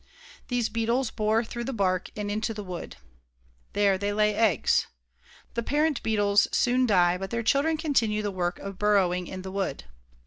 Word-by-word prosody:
These 245 -3 0
beetles 230 +2 0
bore 215 +2 +1
through 235 +1 -6
the 270 - -3
bark 185 -4 0
and 205 -1 -3
into 220 +2 -2
the 210 - -5
wood. 180 -3 -7 0.8
There 200 -2 +2
they 205 +1 -1
lay 210 0 +2
eggs. 205 - +2 0.7
The 235 - -1
parent 295 +4 0
beetles 205 -2 +3
soon 250 +1 +2
die 180 -3 +3
but 195 0 -5
their 235 +2 -2
children 285 +7 +2
continue 225 -9 +1
the 205 - -1
work 180 -2 -2
of 195 -1 -8
burrowing 185 -4 +2
in 185 0 -7
the 190 - -6
wood. 190 - -3
210 Hz, 175 wpm, -27 LUFS, 195-235 Hz, 0.8 s, beetles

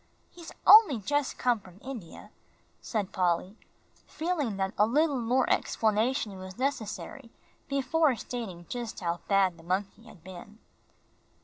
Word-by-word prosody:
"He's 340 -2 -11
only 405 - +8
just 290 +7 -1
come 245 -3 +1
from 185 -2 -16
India," 240 -11 -9 0.5
said 210 -4 -3
Polly, 180 +2 0 0.5
feeling 310 - -2
that 190 0 -1
a 210 - +3
little 290 +2 +2
more 245 +3 +1
explanation 220 -1 0
was 185 +1 -9
necessary 240 -3 -4 0.4
before 275 +1 +2
stating 220 -8 -6
just 240 -2 -5
how 170 -1 -2
bad 195 -3 +2
the - - -15
monkey 195 +5 -3
had 195 -8 -16
been. 190 +3 -11
220 Hz, 130 wpm, -29 LUFS, 190-265 Hz, 0.5 s, only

